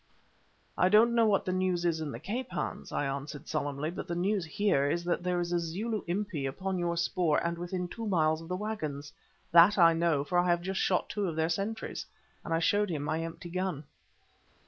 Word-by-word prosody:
"I 180 Hz, -, +5 dB
don't 225 Hz, +4 st, +5 dB
know 230 Hz, -1 st, +4 dB
what 200 Hz, -2 st, +2 dB
the 185 Hz, -, -1 dB
news 185 Hz, -2 st, 0 dB
is 165 Hz, -2 st, +1 dB
in 150 Hz, -2 st, -3 dB
the -, -, -6 dB
Cape, 245 Hz, +4 st, -4 dB
Hans," -, -, -4 dB
I 145 Hz, -, -1 dB
answered, 140 Hz, +2 st, -5 dB
solemnly; 145 Hz, 0 st, -2 dB
"but -, -, -6 dB
the 170 Hz, -, -3 dB
news 190 Hz, +1 st, 0 dB
here 155 Hz, -4 st, +1 dB
is 170 Hz, +3 st, -1 dB
that 175 Hz, 0 st, 0 dB
there 180 Hz, 0 st, 0 dB
is 175 Hz, 0 st, -2 dB
a 175 Hz, -, +2 dB
Zulu 200 Hz, +6 st, -3 dB
Impi 175 Hz, -6 st, -2 dB
upon 190 Hz, +7 st, -3 dB
your 170 Hz, -1 st, -1 dB
spoor 170 Hz, -2 st, +1 dB
and 170 Hz, 0 st, 0 dB
within 175 Hz, +1 st, -3 dB
two 225 Hz, +5 st, -6 dB
miles 160 Hz, -4 st, +2 dB
of 165 Hz, -, -10 dB
the 180 Hz, -, -2 dB
waggons. 155 Hz, -9 st, -4 dB, 0.4 s
That 175 Hz, +5 st, +7 dB
I 165 Hz, -2 st, +7 dB
know, 165 Hz, -4 st, +1 dB
for 175 Hz, +5 st, +1 dB
I 180 Hz, -, +2 dB
have 175 Hz, 0 st, +2 dB
just 190 Hz, +1 st, -2 dB
shot 185 Hz, -, +1 dB
two 205 Hz, -2 st, -2 dB
of 165 Hz, -, -3 dB
their 160 Hz, 0 st, +1 dB
sentries," 205 Hz, +5 st, -3 dB, 0.4 s
and -, -, -7 dB
I 165 Hz, -, +3 dB
showed 205 Hz, +5 st, +2 dB
him 150 Hz, -4 st, -2 dB
my 155 Hz, +2 st, -1 dB
empty 165 Hz, +1 st, -7 dB
gun. 185 Hz, -5 st, -2 dB
175 Hz, 220 wpm, -30 LUFS, 160-190 Hz, 0.4 s, That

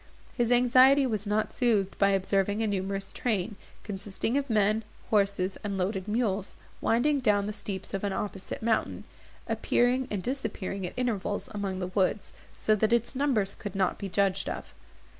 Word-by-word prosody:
His 240 Hz, -1 st, +1 dB
anxiety 255 Hz, +3 st, +6 dB
was 215 Hz, -4 st, -2 dB
not 210 Hz, +1 st, 0 dB
soothed 210 Hz, -6 st, +1 dB
by 200 Hz, -, +5 dB
observing 195 Hz, +2 st, +1 dB
a -, -, +2 dB
numerous 195 Hz, -1 st, -2 dB
train, 215 Hz, -3 st, -1 dB, 0.3 s
consisting 205 Hz, +3 st, -3 dB
of 280 Hz, -1 st, 0 dB
men, 215 Hz, 0 st, +2 dB, 0.3 s
horses, 200 Hz, -3 st, +1 dB
and 200 Hz, -2 st, -2 dB
loaded 190 Hz, +1 st, -1 dB
mules, 210 Hz, -3 st, -1 dB, 0.3 s
winding 280 Hz, +6 st, +2 dB
down 205 Hz, -5 st, +2 dB
the 210 Hz, -, -3 dB
steeps 195 Hz, -3 st, -6 dB
of 195 Hz, -, -2 dB
an 200 Hz, -, 0 dB
opposite 195 Hz, +1 st, -4 dB
mountain, 225 Hz, -1 st, 0 dB, 0.4 s
appearing 250 Hz, +2 st, +2 dB
and 200 Hz, -3 st, -3 dB
disappearing 210 Hz, -7 st, -3 dB
at -, -, -10 dB
intervals 215 Hz, -5 st, -1 dB
among 200 Hz, -2 st, -2 dB
the 185 Hz, -, -2 dB
woods, 195 Hz, +1 st, 0 dB, 0.2 s
so 215 Hz, -, +2 dB
that 220 Hz, +2 st, +2 dB
its 235 Hz, +2 st, +1 dB
numbers 250 Hz, -8 st, +1 dB
could 205 Hz, -3 st, -7 dB
not 190 Hz, -2 st, +1 dB
be 200 Hz, -, -4 dB
judged 195 Hz, 0 st, +1 dB
of. -, -, -6 dB
205 Hz, 165 wpm, -28 LUFS, 195-235 Hz, 0.4 s, anxiety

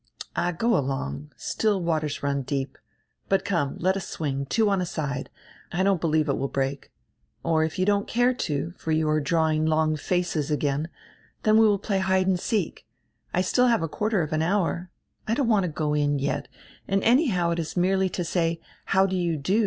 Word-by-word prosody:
"All, 175 Hz, -, +1 dB
go 230 Hz, +7 st, +1 dB
along. 75 Hz, -, -2 dB
Still 210 Hz, -3 st, 0 dB
waters 155 Hz, -5 st, -1 dB
run 140 Hz, 0 st, 0 dB
deep 135 Hz, 0 st, -3 dB, 0.2 s
— -, -, -44 dB
But 195 Hz, 0 st, +2 dB
come, 170 Hz, -8 st, 0 dB
let 185 Hz, +2 st, +1 dB
us 195 Hz, -, -4 dB
swing, 140 Hz, -3 st, -3 dB
two 220 Hz, -, +2 dB
on 195 Hz, -2 st, +2 dB
a -, -, -1 dB
side; 145 Hz, -5 st, -3 dB, 0.4 s
I 180 Hz, +2 st, 0 dB
don't 195 Hz, -3 st, +2 dB
believe 155 Hz, -2 st, +2 dB
it 140 Hz, -, 0 dB
will 135 Hz, -, 0 dB
break. 135 Hz, 0 st, -3 dB, 0.5 s
Or 160 Hz, -1 st, +2 dB
if 160 Hz, 0 st, -3 dB
you 185 Hz, -, +2 dB
don't 205 Hz, 0 st, +1 dB
care 245 Hz, +2 st, +2 dB
to, 150 Hz, -, -2 dB
for 160 Hz, -, -3 dB
you 155 Hz, 0 st, +2 dB
are 155 Hz, 0 st, +2 dB
drawing 155 Hz, +1 st, +1 dB
long 155 Hz, 0 st, +2 dB
faces 170 Hz, -2 st, -1 dB
again, 150 Hz, +1 st, 0 dB, 0.5 s
then 215 Hz, 0 st, +4 dB
we 225 Hz, -, +6 dB
will 205 Hz, -1 st, +3 dB
play 195 Hz, 0 st, -1 dB
hide 190 Hz, 0 st, +2 dB
and 185 Hz, -1 st, +1 dB
seek. 205 Hz, -, -2 dB, 0.4 s
I 180 Hz, -, +1 dB
still 250 Hz, +7 st, +3 dB
have 230 Hz, -8 st, +2 dB
a -, -, 0 dB
quarter 210 Hz, +2 st, 0 dB
of 155 Hz, -, -4 dB
an 155 Hz, -, +1 dB
hour. 180 Hz, 0 st, 0 dB, 0.4 s
I 225 Hz, -, +1 dB
don't 265 Hz, -1 st, +1 dB
want 210 Hz, -5 st, +3 dB
to 170 Hz, -, -3 dB
go 150 Hz, -1 st, -1 dB
in, 145 Hz, -1 st, +1 dB
yet, 140 Hz, -, -2 dB, 0.4 s
and 195 Hz, 0 st, +1 dB
anyhow 225 Hz, -, +3 dB
it 170 Hz, -, -1 dB
is 165 Hz, +2 st, -4 dB
merely 190 Hz, +1 st, +2 dB
to 180 Hz, -, -3 dB
say: 165 Hz, -1 st, 0 dB, 0.3 s
'How 190 Hz, 0 st, +3 dB
do 190 Hz, -1 st, -1 dB
you 170 Hz, -3 st, 0 dB
do?' 185 Hz, +10 st, +1 dB
170 Hz, 210 wpm, -25 LUFS, 150-195 Hz, 0.5 s, we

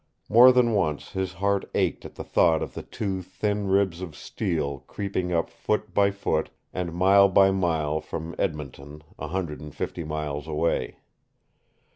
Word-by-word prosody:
More 120 Hz, +4 st, +9 dB
than 125 Hz, -2 st, +3 dB
once 80 Hz, -8 st, -1 dB
his 95 Hz, -1 st, -3 dB
heart 100 Hz, +2 st, 0 dB
ached -, -, 0 dB
at -, -, -10 dB
the -, -, -6 dB
thought 80 Hz, -1 st, +3 dB
of -, -, -7 dB
the -, -, -6 dB
two 95 Hz, -3 st, -4 dB
thin 100 Hz, +3 st, -2 dB
ribs 95 Hz, -2 st, +1 dB
of 85 Hz, -5 st, -7 dB
steel 80 Hz, -9 st, -3 dB
creeping 95 Hz, -3 st, -3 dB
up 85 Hz, -1 st, 0 dB
foot 105 Hz, 0 st, -2 dB
by 100 Hz, -1 st, +4 dB
foot 100 Hz, 0 st, -1 dB, 0.2 s
and 90 Hz, -2 st, -3 dB
mile 100 Hz, +3 st, +5 dB
by 95 Hz, +1 st, +5 dB
mile 80 Hz, -5 st, 0 dB
from 80 Hz, +2 st, -6 dB
Edmonton, 75 Hz, -3 st, -4 dB, 0.2 s
a 80 Hz, -, -4 dB
hundred 85 Hz, -2 st, -3 dB
and 75 Hz, -1 st, -10 dB
fifty 85 Hz, -, -4 dB
miles 75 Hz, -1 st, -4 dB
away. 80 Hz, +1 st, -1 dB
90 Hz, 165 wpm, -26 LUFS, 80-100 Hz, 0.2 s, More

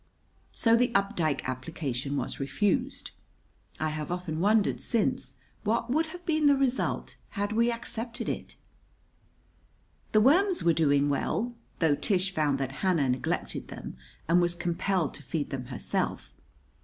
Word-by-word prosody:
So 230 Hz, -1 st, +3 dB
the 240 Hz, 0 st, +3 dB
Updike 165 Hz, -9 st, +1 dB
application 130 Hz, 0 st, -3 dB
was -, -, -3 dB
refused. 215 Hz, -, 0 dB, 0.7 s
I 155 Hz, -, 0 dB
have 155 Hz, 0 st, -4 dB
often 175 Hz, -3 st, -3 dB
wondered 210 Hz, +3 st, +3 dB
since 205 Hz, -, 0 dB, 0.3 s
what 230 Hz, +3 st, 0 dB
would 320 Hz, +4 st, +2 dB
have 355 Hz, +2 st, -10 dB
been 310 Hz, -2 st, +3 dB
the 285 Hz, -, +6 dB
result 265 Hz, -2 st, 0 dB
had 205 Hz, 0 st, -2 dB
we 235 Hz, +2 st, +3 dB
accepted 235 Hz, 0 st, -3 dB
it! -, -, -4 dB, 1.6 s
The 215 Hz, -, +5 dB
worms 350 Hz, -, +4 dB
were 170 Hz, -, +4 dB
doing 145 Hz, -2 st, +3 dB
well, 220 Hz, -, -1 dB, 0.2 s
though 160 Hz, -3 st, +3 dB
Tish 190 Hz, +4 st, +1 dB
found 150 Hz, -4 st, +1 dB
that 135 Hz, -1 st, -2 dB
Hannah 170 Hz, -8 st, +2 dB
neglected 125 Hz, 0 st, -2 dB
them, -, -, -8 dB, 0.3 s
and 175 Hz, +2 st, +5 dB
was 175 Hz, 0 st, +1 dB
compelled 175 Hz, -1 st, 0 dB
to -, -, -9 dB
feed 145 Hz, +2 st, -3 dB
them 130 Hz, -2 st, -4 dB
herself. 120 Hz, -, -2 dB
180 Hz, 145 wpm, -29 LUFS, 145-235 Hz, 1.6 s, the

